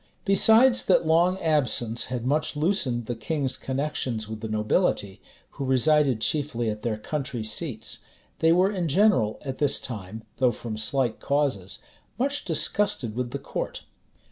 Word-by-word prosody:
Besides 225 Hz, +5 st, +5 dB
that 185 Hz, -, +3 dB
long 170 Hz, +4 st, +3 dB
absence 130 Hz, -9 st, +1 dB
had 125 Hz, -2 st, -4 dB
much 150 Hz, +3 st, 0 dB
loosened 145 Hz, -, 0 dB
the 120 Hz, -, -3 dB
King's 135 Hz, +3 st, -2 dB
connections 130 Hz, -5 st, -2 dB
with 110 Hz, 0 st, -7 dB
the 110 Hz, -, -4 dB
nobility, 110 Hz, -, 0 dB, 0.3 s
who -, -, -6 dB
resided 135 Hz, -1 st, +2 dB
chiefly 125 Hz, -7 st, 0 dB
at 105 Hz, 0 st, -7 dB
their 110 Hz, -2 st, -2 dB
country 130 Hz, -1 st, -4 dB
seats, 110 Hz, +1 st, -4 dB, 0.4 s
they 160 Hz, -, +4 dB
were 185 Hz, +4 st, +4 dB
in 180 Hz, -5 st, -2 dB
general, 170 Hz, -, +3 dB
at 135 Hz, -1 st, -5 dB
this 145 Hz, -2 st, +2 dB
time, 110 Hz, -1 st, -7 dB
though 130 Hz, -1 st, +3 dB
from 115 Hz, -1 st, -6 dB
slight 110 Hz, +3 st, -1 dB
causes, 135 Hz, -10 st, -1 dB, 0.3 s
much 280 Hz, +4 st, -1 dB
disgusted 165 Hz, -, +1 dB
with 125 Hz, 0 st, -2 dB
the -, -, -4 dB
court. -, -, -5 dB
135 Hz, 150 wpm, -25 LUFS, 115-160 Hz, 0.4 s, Besides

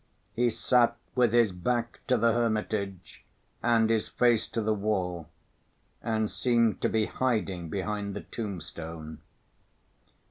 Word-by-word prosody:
He 120 Hz, +1 st, +2 dB
sat 120 Hz, +1 st, +2 dB, 0.2 s
with 125 Hz, -3 st, +3 dB
his 120 Hz, -3 st, +4 dB
back 120 Hz, +6 st, -2 dB
to 130 Hz, -2 st, +3 dB
the 115 Hz, 0 st, +3 dB
hermitage 105 Hz, -5 st, -2 dB, 0.4 s
and 115 Hz, -2 st, +3 dB
his 110 Hz, -1 st, +1 dB
face 120 Hz, -3 st, +2 dB
to -, -, -3 dB
the 110 Hz, 0 st, +1 dB
wall, 95 Hz, -5 st, -2 dB, 0.7 s
and 110 Hz, -2 st, -1 dB
seemed 115 Hz, -3 st, +2 dB
to -, -, +2 dB
be 110 Hz, -1 st, +2 dB
hiding 100 Hz, -11 st, -1 dB
behind 100 Hz, +3 st, -3 dB
the -, -, -4 dB
tombstone. 85 Hz, -6 st, -6 dB
110 Hz, 130 wpm, -28 LUFS, 95-120 Hz, 0.7 s, his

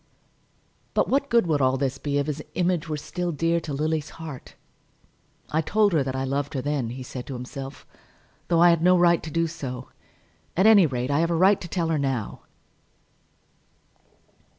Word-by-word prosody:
But -, -, +2 dB
what 280 Hz, +1 st, +1 dB
good 235 Hz, -4 st, +4 dB
would 155 Hz, -4 st, +1 dB
all 130 Hz, 0 st, +3 dB
this 135 Hz, -1 st, -2 dB
be 145 Hz, -1 st, -1 dB
if 140 Hz, -, +1 dB
his 150 Hz, 0 st, -4 dB
image 175 Hz, -2 st, 0 dB
were 155 Hz, -, -2 dB
still 175 Hz, +4 st, -4 dB
dear 165 Hz, +2 st, +1 dB
to 160 Hz, -2 st, -7 dB
Lily's 155 Hz, +1 st, -1 dB
heart? 160 Hz, -5 st, -9 dB, 1.0 s
"I 160 Hz, -, +2 dB
told 205 Hz, +4 st, +2 dB
her 155 Hz, -, +3 dB
that 130 Hz, -1 st, -3 dB
I 130 Hz, -, -1 dB
loved 140 Hz, +3 st, -2 dB
her 130 Hz, -, -1 dB
then," 145 Hz, -5 st, -1 dB
he 130 Hz, +2 st, -7 dB
said 125 Hz, 0 st, -8 dB
to 135 Hz, -, -5 dB
himself, 135 Hz, +2 st, -8 dB, 0.6 s
"though 170 Hz, -1 st, +3 dB
I 175 Hz, -, +7 dB
had 170 Hz, -1 st, +1 dB
no 180 Hz, +1 st, +5 dB
right 175 Hz, -1 st, +4 dB
to 160 Hz, -, -7 dB
do 165 Hz, +1 st, 0 dB
so. 135 Hz, -6 st, -6 dB, 0.7 s
At 190 Hz, -, +4 dB
any 210 Hz, -6 st, +7 dB
rate 125 Hz, 0 st, -2 dB
I 145 Hz, -, +2 dB
have 165 Hz, +1 st, +1 dB
a 170 Hz, -, +1 dB
right 190 Hz, +4 st, +4 dB
to 175 Hz, -, -6 dB
tell 170 Hz, -1 st, -1 dB
her 160 Hz, -2 st, +1 dB
now." 135 Hz, -6 st, -2 dB
155 Hz, 195 wpm, -25 LUFS, 135-170 Hz, 1.0 s, I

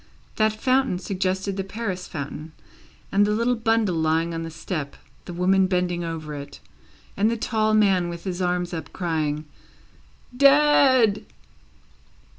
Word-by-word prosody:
That 215 Hz, 0 st, +3 dB
fountain 260 Hz, -5 st, +2 dB
suggested 190 Hz, +1 st, -2 dB
the 195 Hz, -, -1 dB
Paris 195 Hz, -2 st, -5 dB
fountain, 150 Hz, +1 st, -7 dB, 0.6 s
the 195 Hz, -, 0 dB
little 215 Hz, +4 st, +2 dB
bundle 225 Hz, -4 st, +1 dB
lying 160 Hz, +1 st, 0 dB
on 165 Hz, -, -3 dB
the 165 Hz, -, -5 dB
step, 160 Hz, -3 st, -5 dB, 0.3 s
the -, -, -7 dB
women 185 Hz, +2 st, +3 dB
bending 180 Hz, -2 st, -1 dB
over 160 Hz, -2 st, -5 dB
it, 140 Hz, -1 st, -8 dB, 0.6 s
and 210 Hz, +3 st, +2 dB
the 230 Hz, -, -1 dB
tall 215 Hz, -1 st, +1 dB
man 190 Hz, -5 st, +3 dB
with 170 Hz, -1 st, -7 dB
his 185 Hz, -1 st, -4 dB
arms 180 Hz, -1 st, -1 dB
up, 165 Hz, -, -6 dB
crying, 155 Hz, -3 st, -2 dB, 0.9 s
"Dead!" 275 Hz, -5 st, +5 dB
185 Hz, 135 wpm, -24 LUFS, 165-215 Hz, 0.9 s, Dead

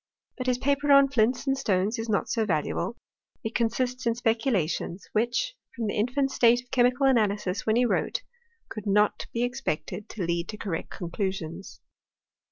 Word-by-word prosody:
But 255 Hz, -1 st, -5 dB
his 250 Hz, -1 st, +2 dB
paper 285 Hz, +2 st, +1 dB
on 275 Hz, 0 st, +7 dB
flints 245 Hz, 0 st, +1 dB
and 270 Hz, -1 st, +2 dB
stones 210 Hz, -2 st, 0 dB
is 225 Hz, 0 st, -4 dB
not 205 Hz, -, +1 dB
so 225 Hz, -, 0 dB
valuable; 185 Hz, +5 st, -1 dB, 0.5 s
it 220 Hz, 0 st, -3 dB
consists 245 Hz, +2 st, 0 dB
in 230 Hz, -, +2 dB
speculations, 225 Hz, -, -1 dB
which, 240 Hz, -, 0 dB, 0.2 s
from 235 Hz, -2 st, -3 dB
the 205 Hz, -, -1 dB
infant 255 Hz, +5 st, 0 dB
state 240 Hz, 0 st, +4 dB
of 250 Hz, -, -33 dB
chemical 250 Hz, +2 st, +3 dB
analysis 210 Hz, -7 st, +1 dB
when 220 Hz, -, +3 dB
he 245 Hz, +1 st, +4 dB
wrote, -, -, 0 dB, 0.4 s
could 215 Hz, -1 st, -7 dB
not 210 Hz, +1 st, +2 dB
be 235 Hz, -, -1 dB
expected 245 Hz, -, -3 dB
to 195 Hz, -5 st, -4 dB
lead 170 Hz, 0 st, -1 dB
to 215 Hz, -, -5 dB
correct 190 Hz, -6 st, -4 dB
con 175 Hz, -3 st, -6 dB
clusions. 190 Hz, -2 st, -4 dB
230 Hz, 175 wpm, -27 LUFS, 200-250 Hz, 0.5 s, on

